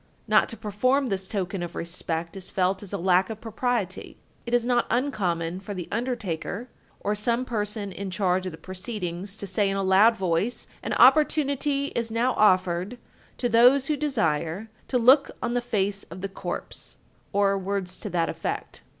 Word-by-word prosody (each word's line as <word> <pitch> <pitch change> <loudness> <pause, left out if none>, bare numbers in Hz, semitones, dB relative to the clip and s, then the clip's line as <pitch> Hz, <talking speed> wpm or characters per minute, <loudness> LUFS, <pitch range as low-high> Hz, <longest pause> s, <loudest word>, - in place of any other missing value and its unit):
Not - - +4
to 230 - -5
perform 255 +6 +1
this 190 -1 -2
token 195 -2 -3
of 175 -1 -5
respect 170 0 -4
is 190 -1 -6
felt 190 0 0
as 205 - -9
a 200 - -1
lack 185 +2 +3
of 220 -1 -6
propriety. 225 -3 -2 0.3
It 235 - -3
is 240 -1 +2
not 245 -1 +2
uncommon 185 -10 0
for 200 +1 -7
the 180 -2 -5
undertaker, 230 -2 -3 0.3
or 205 - 0
some 235 +4 0
person 210 -3 -3
in 195 +1 -5
charge 185 -1 0
of - - -4
the 160 - -10
proceedings, 185 0 -5
to 205 - -6
say 200 +1 +1
in 195 - -1
a 195 - 0
loud 200 +5 +5
voice: 185 +5 -1 0.2
"An - - -3
opportunity 285 -2 +4
is 230 -1 -1
now 235 +3 +1
offered 185 +2 +2 0.4
to 245 - 0
those 245 +4 +6
who 300 - +1
desire 215 - -1 0.2
to 255 - +1
look 260 +4 +6
on 240 - -2
the 245 - +1
face 205 -4 -1
of 175 +2 -10
the 195 - -3
corpse," 195 - -6 0.3
or 200 -1 +3
words 195 -1 -3
to - - -5
that 170 -2 +1
effect. - - -4
200 Hz, 180 wpm, -26 LUFS, 185-240 Hz, 0.4 s, those